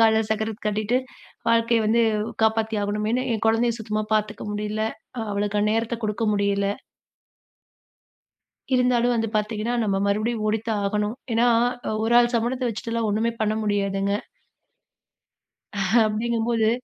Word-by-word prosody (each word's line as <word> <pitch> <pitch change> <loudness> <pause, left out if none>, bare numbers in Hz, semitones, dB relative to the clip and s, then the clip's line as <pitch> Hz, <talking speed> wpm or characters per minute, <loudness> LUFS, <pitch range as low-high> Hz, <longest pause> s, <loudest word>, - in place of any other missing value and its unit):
காலில் 220 -1 +4
சக்கரத்தை 220 +1 -2
கட்டிக்கொண்டு, 215 +4 +1 0.5
வாழ்க்கையை 230 0 +3
வந்து 235 +2 +3 0.4
காப்பாற்றி 220 -1 +1
ஆகவேண்டும் 210 +1 -1
என்று, 255 +1 0
என் 225 0 -2
குழந்தையை 230 +1 +2
சுத்தமாக 215 -1 -2
பார்த்துக்க 210 0 -2
முடியல்லை. 210 +1 -2 0.5
அவளுக்கு 205 +1 0
நேரத்தை 225 +1 -1
கொடுக்க 210 +2 -2
முடியல்லை. 200 0 +1 2.0
இருந்தாலும் 245 -1 +3
வந்து 225 -1 0
பார்த்தீங்க 210 0 -1
என்றால், 240 +1 0
நம்ம 195 -2 +1
மறுபடியும் 215 +2 0
ஓடித்தான் 220 0 -1
ஆகவேண்டும். 210 +2 -1 0.2
ஏன் 225 - +2
என்றால், 240 -1 +1
ஒரு 225 +1 +1
ஆள் 240 0 +2
சம்பளத்தை 245 +3 -1
வைத்துவிட்டு 230 +1 -5
எல்லாம் 230 -1 0
ஒன்றுமே 225 +3 +1
பண்ண 215 0 +1
முடியாதுங்க. 200 -1 0 1.9
அப்படி 215 +2 -1
என்கும்போது 230 -1 +1
220 Hz, 130 wpm, -24 LUFS, 210-230 Hz, 2.0 s, காலில்